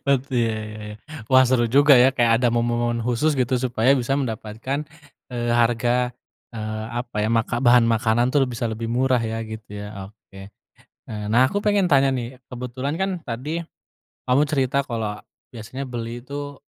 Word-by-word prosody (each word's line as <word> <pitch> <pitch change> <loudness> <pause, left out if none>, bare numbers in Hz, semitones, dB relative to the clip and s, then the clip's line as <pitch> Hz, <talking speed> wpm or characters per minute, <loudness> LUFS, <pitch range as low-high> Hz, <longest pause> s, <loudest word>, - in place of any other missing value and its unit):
Oh 140 - +6
tuh 130 -2 -3
ya 115 -1 +1 0.2
ya 110 - -9
ya. - - -12 0.3
Wah 130 0 +7
seru 120 -2 +3
juga 140 +4 +6
ya 130 +2 +6
kayak 115 -2 +3
ada 120 - +4
momen-momen 120 0 0
khusus 125 +6 +1
gitu 130 -1 0
supaya 125 0 +2
bisa 130 +2 0
mendapatkan, 130 +3 -3 0.5
eee, 120 -1 -2
harga, 120 +1 +2 0.4
eee, 110 0 -4
apa 120 -3 -9
ya, - - +1
maka 115 +1 +1
bahan 120 -1 +5
makanan 115 +1 +2
tuh 145 -1 +3
bisa 120 -1 -3
lebih 110 +1 -4
murah 130 +1 +2
ya, 115 0 -3
gitu 110 -1 -9
ya, 100 -2 -7
oke. 95 -2 -15 0.7
Eee, 105 -1 -5
nah 125 +3 +5
aku 205 +6 -2
pengen 205 -2 +2
tanya 135 -1 +4
nih, 125 +1 -5
kebetulan 125 +3 -4
kan 190 0 0
tadi, 145 +7 -4 0.6
kamu 125 +3 +3
cerita 140 -2 +1
kalau 110 -4 -3 0.3
biasanya 120 +4 -6
beli 120 -1 -5
tuh, 145 0 -7
120 Hz, 170 wpm, -23 LUFS, 115-130 Hz, 0.7 s, Wah